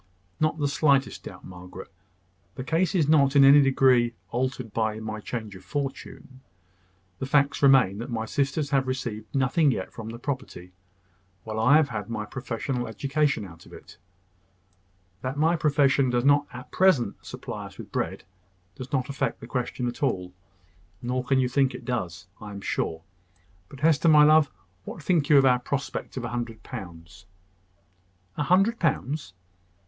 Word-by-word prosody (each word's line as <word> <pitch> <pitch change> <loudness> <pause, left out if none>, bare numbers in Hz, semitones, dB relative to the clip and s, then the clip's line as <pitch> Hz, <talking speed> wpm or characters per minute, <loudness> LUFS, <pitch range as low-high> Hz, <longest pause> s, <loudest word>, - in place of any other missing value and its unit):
"Not 155 0 +1
the 145 -2 0
slightest 140 -1 +1
doubt, - - -10
Margaret. 90 +1 -11 0.6
The 130 - -5
case 170 +7 0
is 160 -6 +2
not 145 -3 +4
in 140 - +7
any 140 +2 +8
degree 130 -3 +3 0.2
altered 125 -2 -3
by 110 -1 -1
my 110 -1 -5
change 110 -2 -6
of 95 - -13
fortune. 135 0 -6 0.8
The 130 - -3
facts 140 0 +2
remain, 130 -8 +5
that 120 +3 -6
my 110 -2 -3
sisters 140 +3 -1
have 135 -2 +2
received 120 -4 -4
nothing 135 +4 +3
yet 95 -8 -3
from 110 -1 -7
the 115 - -7
property, 130 -9 -6 0.7
while 110 0 -4
I 125 +6 +5
have 155 -3 +2
had 105 -3 -5
my 110 -2 -3
professional 125 +1 -4
education 140 +2 -1
out 85 -3 -14
of - - -15
it. - - -14 1.2
That 130 +2 -4
my 160 +3 +3
profession 140 -4 +2
does 120 +1 0
not 145 0 +4
at 125 +1 -10
present 165 - +2
supply - - -7
us - - -16
with - - -10
bread - - -3 0.5
does 130 +7 -9
not 130 -3 0
affect 140 0 -2
the - - -9
question 125 -1 -3
at 120 - -6
all: 90 -10 -1 0.7
nor 125 +1 -1
can 135 +1 +1
you 130 - +2
think 135 +1 +1
that - - -5
it - - -14
does, 90 -9 -3 0.2
I 105 - -8
am 100 -1 -8
sure. 80 -4 -2 0.7
But 140 - -12
Hester, 160 +1 +4
my 150 -1 +7
love, 155 0 +5 0.3
what 160 - -9
think 160 -4 +1
you 150 - +7
of 135 - +6
our 125 -1 +4
prospect 135 +1 -4
of 125 - -3
a - - -4
hundred 120 -2 -5
pounds?" 85 +1 -10 1.1
"A - - -3
hundred 195 - +3
pounds!" 145 - -1
130 Hz, 175 wpm, -26 LUFS, 115-145 Hz, 1.2 s, any